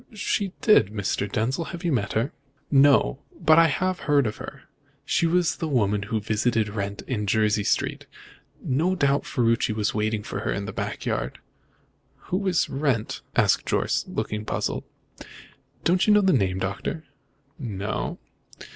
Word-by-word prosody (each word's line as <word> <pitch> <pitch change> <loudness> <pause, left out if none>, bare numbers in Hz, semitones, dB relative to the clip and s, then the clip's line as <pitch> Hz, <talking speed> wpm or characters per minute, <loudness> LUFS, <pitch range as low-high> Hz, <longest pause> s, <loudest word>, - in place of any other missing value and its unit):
"She 200 -1 -1
did, 210 - +5
Mr. 105 -1 -2
Denzil. 130 +9 -1
Have 170 +2 -7
you 170 - +1
met 110 -7 0
her?" 115 +6 0 0.4
"No, 135 - +5 0.2
but 160 +1 +6
I 165 - +6
have 185 +4 -1
heard 145 -3 +2
of 105 - -3
her. - - -9 0.4
She 170 - +2
was 175 0 +1
the 165 - -3
woman 105 -8 +1
who 105 +2 -2
visited 110 +1 0
Wrent 100 -1 -4
in 105 -5 -3
Jersey 105 0 +2
Street. - - -1 0.6
No 165 +8 +1
doubt 140 -4 +1
Ferruci 115 -3 +1
was 110 0 0
waiting 110 0 -1
for - - -5
her - - -2
in - - -2
the - - -6
back - - -4
yard." - - -2 1.0
"Who 195 +1 0
is 180 -3 +2
Wrent?" 135 -6 -1
asked - - +3
Jorce, - - +1
looking 105 0 -3
puzzled. - - -2 1.0
"Don't 180 +4 +2
you 210 - +6
know 210 - +6
the 190 -1 +3
name, 95 -7 +1
Doctor?" 100 +11 -3 0.6
"No." 105 -6 -3
120 Hz, 160 wpm, -25 LUFS, 105-165 Hz, 1.0 s, but